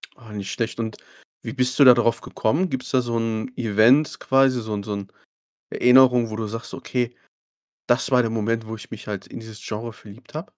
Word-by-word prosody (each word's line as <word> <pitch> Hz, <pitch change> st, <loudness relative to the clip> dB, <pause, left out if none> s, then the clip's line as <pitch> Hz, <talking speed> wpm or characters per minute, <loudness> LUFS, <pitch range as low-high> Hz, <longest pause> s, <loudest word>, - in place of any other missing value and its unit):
Ah, 115 Hz, -4 st, -15 dB
nicht 100 Hz, -2 st, -5 dB
schlecht, 115 Hz, 0 st, -3 dB
und 110 Hz, -1 st, -4 dB, 0.4 s
wie -, -, -6 dB
bist 125 Hz, -1 st, +2 dB
du -, -, +8 dB
da 125 Hz, -2 st, +9 dB
drauf 115 Hz, -1 st, +1 dB
gekommen? 165 Hz, +12 st, -1 dB
Gibt's 130 Hz, -3 st, -3 dB
da 130 Hz, -2 st, +3 dB
so 120 Hz, -1 st, -2 dB
'n 115 Hz, +1 st, -2 dB
Event 120 Hz, +6 st, +3 dB
quasi, 135 Hz, -2 st, +2 dB
so 110 Hz, -1 st, -5 dB
'n 100 Hz, -, -3 dB
so 105 Hz, 0 st, -4 dB
'n 100 Hz, -1 st, -6 dB, 0.6 s
Erinnerung, 125 Hz, -2 st, +5 dB
wo 110 Hz, -, -5 dB
du 110 Hz, -1 st, -3 dB
sagst: 115 Hz, +3 st, -6 dB
„Okay, 125 Hz, -1 st, -3 dB, 0.7 s
das 120 Hz, +3 st, +2 dB
war 125 Hz, -1 st, +4 dB
der 115 Hz, -, -2 dB
Moment, 115 Hz, 0 st, -1 dB
wo 110 Hz, -, -5 dB
ich 110 Hz, -, -12 dB
mich 110 Hz, -, -9 dB
halt 100 Hz, -2 st, -5 dB
in -, -, -9 dB
dieses 110 Hz, -1 st, -10 dB
Genre 115 Hz, +2 st, -5 dB
verliebt 115 Hz, +4 st, -15 dB
habe." 155 Hz, -, -4 dB
115 Hz, 215 wpm, -23 LUFS, 110-125 Hz, 0.7 s, da